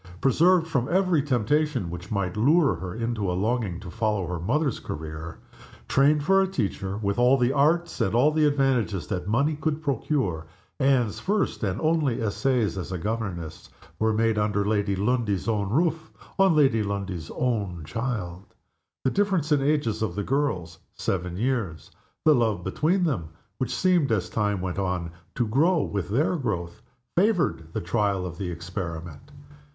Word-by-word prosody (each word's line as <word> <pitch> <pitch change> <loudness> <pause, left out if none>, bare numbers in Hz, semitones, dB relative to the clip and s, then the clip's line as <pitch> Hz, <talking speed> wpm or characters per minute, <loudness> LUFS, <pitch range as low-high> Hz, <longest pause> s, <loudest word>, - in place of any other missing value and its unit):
Preserved 165 - +4
from 135 -6 -1
every 185 -3 +3
temptation 140 - 0
which 90 +3 -7
might 100 -4 -1
lure 140 - +4
her 90 +2 -6
into 115 -4 -1
a 90 - -2
longing 105 -3 -1
to 90 -3 -8
follow 105 -3 0
her 90 0 -4
mother's 140 - 0
career; 80 +1 -7 0.5
trained 145 +2 +3
for 195 +4 +4
a 190 - +2
teacher's 100 - -2
life, 105 +2 -6
with 100 +3 0
all 125 +2 +5
the 125 +1 +2
arts 160 +5 +2
and 95 +3 +1
all 135 +6 +5
the 155 0 +2
advantages 135 -9 +1
that 90 0 -4
money 140 +8 +2
could 155 +1 -2
procure, 115 - -1 0.3
Anne's 130 -5 +2
first 205 +1 -1
and 95 -3 -1
only 155 -6 +1
essays 115 -1 0
as 90 - -6
a 90 - -2
governess 95 -5 -4 0.3
were 110 0 +2
made, 110 0 +1
under 105 -1 +1
Lady 105 -1 +1
Lundie's 105 -1 0
own 105 -3 0
roof, 160 - 0 0.3
on 190 -4 +5
Lady 135 -7 +4
Lundie's 100 -5 -4
own 100 -9 -1
child. 95 - -4 0.6
The 130 - +2
difference 190 -7 +1
in 145 - +5
the 135 +1 +1
ages 115 -8 0
of 100 -6 -1
the 105 - -2
girls 95 - -1 0.2
seven 90 -1 -2
years 110 - -2 0.3
the 155 - +7
love 110 -8 +1
between 165 - +1
them, 100 - -1 0.3
which 130 - -1
seemed, 180 -8 +2
as 100 -5 0
time 105 -3 0
went 95 +1 -3
on, 90 -3 -2 0.2
to 120 - 0
grow 155 +8 +3
with 100 -3 -3
their 150 - +1
growth, 105 - -3 0.3
favored 175 - +1
the - - -2
trial 95 0 0
of 85 -2 -7
the 95 - -3
experiment. 85 - -6
110 Hz, 170 wpm, -26 LUFS, 95-145 Hz, 0.6 s, the